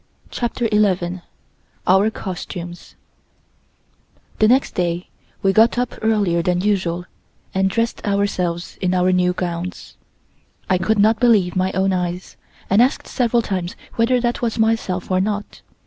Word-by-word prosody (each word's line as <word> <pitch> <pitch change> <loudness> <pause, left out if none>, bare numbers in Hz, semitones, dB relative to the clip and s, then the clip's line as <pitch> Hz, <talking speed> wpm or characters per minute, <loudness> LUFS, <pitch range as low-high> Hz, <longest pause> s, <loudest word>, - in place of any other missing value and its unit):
CHAPTER 240 0 -1
ELEVEN 185 -4 +1 0.6
OUR 190 +4 +4
COSTUMES 175 -3 -7 1.4
THE 215 - +5
next 255 +4 +3
day 175 0 -2 0.3
we 195 0 +3
got 225 +4 +4
up 245 0 -1
earlier 205 -6 +2
than 180 +1 0
usual 180 -4 0 0.5
and 190 0 +2
dressed 230 +3 -1
ourselves 185 -4 -1
in 185 -1 +1
our 180 0 +3
new 180 0 +2
gowns. 180 +1 -5 0.7
I 185 -1 +2
could 220 +4 +1
not 215 +2 +4
believe 215 -7 +3
my 185 0 +1
own 190 +1 +1
eyes, 180 0 -3 0.3
and 200 +4 +4
asked 255 +2 +2
several 240 -2 +1
times 185 -1 -3 0.2
whether 240 +2 +2
that 240 0 -1
was 235 -2 -1
myself 220 -5 0
or 185 0 +3
not. 205 +1 -3
190 Hz, 140 wpm, -20 LUFS, 180-220 Hz, 1.4 s, THE